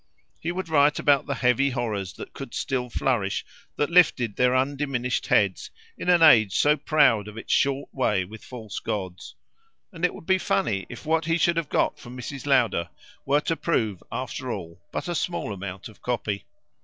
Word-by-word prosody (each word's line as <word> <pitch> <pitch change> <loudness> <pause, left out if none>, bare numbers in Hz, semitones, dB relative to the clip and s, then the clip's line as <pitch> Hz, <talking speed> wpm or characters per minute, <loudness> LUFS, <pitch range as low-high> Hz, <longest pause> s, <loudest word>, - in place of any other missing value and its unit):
He 165 - -2
would 185 0 -4
write 150 -2 +4
about 140 -2 +3
the 140 - -1
heavy 125 +3 +2
horrors 110 - -3
that - - -10
could - - -8
still 125 -2 -2
flourish, 115 -6 -1 0.3
that 145 +2 -1
lifted 125 - +4
their 125 0 +3
undiminished 135 -2 -1
heads, 100 -3 +2 0.3
in - - -4
an 175 -2 +5
age 110 -11 +6
so 150 +1 +4
proud 140 -8 +3
of 105 +1 -10
its 115 - -2
short 140 0 +1
way 105 -8 +1
with 110 +3 -12
false 110 -5 -7
gods; 95 -4 -5 0.6
and 165 -1 -10
it 180 - +2
would - - -12
be 190 +1 +3
funny 100 - 0
if - - -9
what 160 0 +1
he 165 0 +2
should 170 0 +2
have 165 -3 -1
got 150 - +1
from 125 -2 -10
Mrs. 135 +2 -7
Lowder 115 - +2 0.4
were 145 +2 +3
to 165 - -1
prove 110 - -1
after - - -4
all 85 +1 -7
but - - -4
a 175 - -1
small 170 -9 -2
amount 95 -1 -7
of 110 - -17
copy. 105 -4 -2
130 Hz, 190 wpm, -25 LUFS, 105-150 Hz, 0.6 s, age